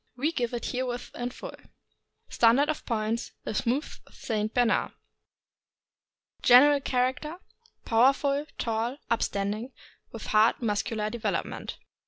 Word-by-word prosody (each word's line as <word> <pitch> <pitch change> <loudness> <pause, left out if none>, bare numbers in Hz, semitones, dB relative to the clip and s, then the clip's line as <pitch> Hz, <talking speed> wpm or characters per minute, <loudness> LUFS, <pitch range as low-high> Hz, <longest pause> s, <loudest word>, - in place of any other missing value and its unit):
We 295 +6 +1
give 245 -7 -2
it 235 - -4
herewith 245 -1 -3
in 245 0 -3
full. - - -9 0.7
STANDARD 240 +6 +4
OF 310 - -3
POINTS 225 0 -2
— - - -52
THE - - -4
SMOOTH 245 +8 -1
ST. 215 -2 -3
BERNARD. 245 -1 +1 1.5
General 280 +3 +7
character. 260 +6 -1 0.3
— 465 - -34
Powerful, 275 +5 +3
tall, 230 +3 -2
upstanding, 215 +2 -1 0.4
with 225 - -8
hard 215 +2 +3
muscular 215 -1 -1
development. 235 -2 -3
240 Hz, 120 wpm, -27 LUFS, 225-270 Hz, 1.5 s, General